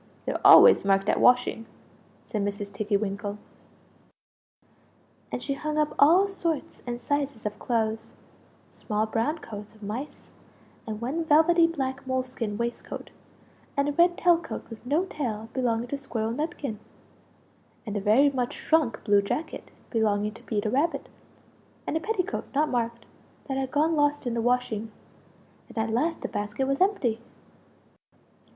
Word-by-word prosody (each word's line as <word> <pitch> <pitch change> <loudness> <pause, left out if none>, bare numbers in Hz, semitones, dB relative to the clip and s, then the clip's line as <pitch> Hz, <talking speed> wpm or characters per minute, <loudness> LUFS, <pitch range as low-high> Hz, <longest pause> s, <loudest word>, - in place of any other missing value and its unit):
They're - - -2
always - - +9
marked 195 +1 +2
at - - +2
washing!" 245 -2 +3 0.6
said 210 -2 -3
Mrs. 205 0 -4
Tiggy 205 0 0
winkle. 205 0 -3 1.9
And - - -4
she 280 - -1
hung 305 +2 -3
up 300 0 +1
all 350 +7 +6
sorts 335 -6 -3
and 240 0 -3
sizes 280 -3 -2
of 210 0 -4
clothes 225 -2 -1 0.6
small 210 0 -2
brown 230 +8 -1
coats 210 -7 -9
of 215 - -16
mice; 230 +8 -6 0.6
and 215 -1 -4
one 285 +8 -1
velvety 325 +2 +5
black 265 -5 -4
moleskin 255 -5 -2
waist 235 +1 -3
coat; - - -8 0.7
and 280 0 +2
a - - +1
red 345 +4 +3
tailcoat 340 -2 +1
with 225 - -9
no 310 +7 +2
tail 225 - -4
belonging 240 -2 0
to 280 - -3
Squirrel 225 -5 -3
Nutkin; 280 -5 -4 1.1
and 210 -2 -5
a 205 - -1
very 240 +8 +4
much 250 -2 -2
shrunk 315 -7 +1
blue 205 -2 +4
jacket 250 +10 -4 0.2
belonging 210 -2 +1
to - - -14
Peter 210 -1 -2
Rabbit; 295 +6 0 0.8
and - - -2
a - - +2
petticoat, 410 +1 -2
not 300 +2 +2
marked, 235 -1 -2 0.4
that 270 -1 -2
had 265 -1 -1
gone 310 +4 +2
lost 290 -1 +1
in 240 - -1
the 230 - 0
washing 225 -2 0 0.8
and 235 - -13
at 220 0 0
last 320 +8 0
the - - -2
basket 210 +6 -2
was 275 +3 -1
empty! 260 - +1
245 Hz, 150 wpm, -27 LUFS, 220-295 Hz, 1.9 s, always